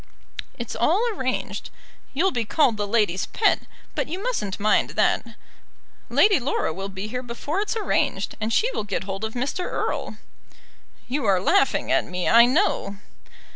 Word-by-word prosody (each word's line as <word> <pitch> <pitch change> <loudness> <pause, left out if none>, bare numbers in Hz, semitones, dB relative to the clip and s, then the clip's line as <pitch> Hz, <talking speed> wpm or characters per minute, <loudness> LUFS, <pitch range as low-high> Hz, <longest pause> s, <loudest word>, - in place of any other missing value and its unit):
"It's 235 -2 -5
all 325 - +3
arranged. 260 -9 -3 0.5
You'll 375 +7 +2
be 240 -2 -1
called 245 +1 +2
the 205 -1 -2
ladies' 205 -4 +1
pet, 425 -2 +1 0.3
but - - -2
you 345 - -4
mustn't 390 - -3
mind 210 +1 +2
that. - - +1 0.7
Lady 405 -5 +4
Laura 250 - -1
will 195 +3 -5
be 195 +2 -5
here 250 +3 -4
before 260 +9 -3
it's 425 +2 -2
arranged, 430 - 0
and 220 +1 -1
she 465 - +2
will - - -3
get 205 -1 -3
hold 195 +2 -5
of 220 0 -3
Mr. 280 +9 -2
Erle." - - -3 0.9
"You 270 0 -2
are 195 -3 +4
laughing 395 - +2
at - - +3
me, 180 0 -3
I 235 +1 +8
know." 250 - +1
235 Hz, 165 wpm, -24 LUFS, -, 0.9 s, I